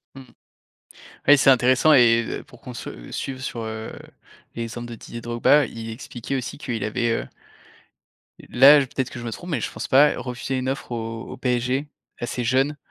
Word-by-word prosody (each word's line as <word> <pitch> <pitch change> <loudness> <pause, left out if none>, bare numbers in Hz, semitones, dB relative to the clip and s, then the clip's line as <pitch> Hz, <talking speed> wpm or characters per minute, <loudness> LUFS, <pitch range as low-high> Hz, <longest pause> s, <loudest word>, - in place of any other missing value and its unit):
Mmh. 135 - -9 1.1
Oui, 145 0 +8
c'est 135 - +6
intéressant 130 +4 +4
et 115 -4 +4
pour - - -17
qu'on - - -9
se - - -9
suive 130 -1 -5
sur, 120 -2 -5
heu, 110 0 -6 0.6
les 115 0 -4
centres 120 +1 -7
de 120 - -7
Didier 115 +1 -9
Drogba. 120 +5 +3
Il 115 0 -7
expliquait 120 +2 -5
aussi 130 +2 -5
qu'il 120 -6 -4
avait, 120 +2 -1
heu 115 - -2 1.2
là, 140 +4 +8
peut-être 130 -1 -3
que 120 - -8
je 120 - -7
me 115 - -4
trompe 175 +10 -8
mais 145 -9 -1
je - - -3
pense - - -6
pas 145 +3 +5
refusé 125 +1 -4
une 130 0 -2
offre 135 -1 -5
au 115 -1 -4
au 130 - -9
PSG. 125 +2 -1 0.3
Assez 120 +1 -3
jeune, 135 +5 +1
125 Hz, 185 wpm, -23 LUFS, 115-135 Hz, 1.2 s, Oui